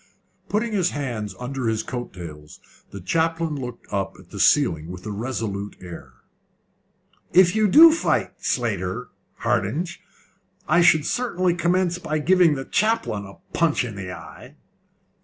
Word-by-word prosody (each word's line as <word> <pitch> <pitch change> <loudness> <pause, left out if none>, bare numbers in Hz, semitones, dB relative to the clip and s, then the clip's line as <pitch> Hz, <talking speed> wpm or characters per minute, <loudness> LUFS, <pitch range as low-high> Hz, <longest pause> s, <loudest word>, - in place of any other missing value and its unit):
Putting 225 +3 0
his 185 -4 +2
hands 120 -8 -4
under 125 0 -3
his 110 -1 0
coat 120 -1 -5
tails, 75 -4 -10 0.3
the 100 - -8
chaplain 165 - 0
looked 125 -4 -7
up 100 -1 -2
at - - -18
the - - -7
ceiling 80 0 +3
with 90 0 -9
a 105 - -4
resolute 105 -2 -4
air. 85 -8 -10 1.2
"If 185 +1 +6
you 215 -1 +3
do 320 - +9
fight 330 - 0
Slater, 110 -1 -2 0.3
Hardinge, 170 +3 -1 0.7
I 175 +3 +4
should 155 -3 +5
certainly 185 -8 0
commence 175 +1 +1
by 155 -3 -2
giving 175 0 +4
the 135 -1 -5
chaplain 210 - 0
a 100 - -13 0.2
punch 160 -6 +2
in 115 - -6
the 95 -2 -6
eye." - - -11
135 Hz, 145 wpm, -23 LUFS, -, 1.2 s, do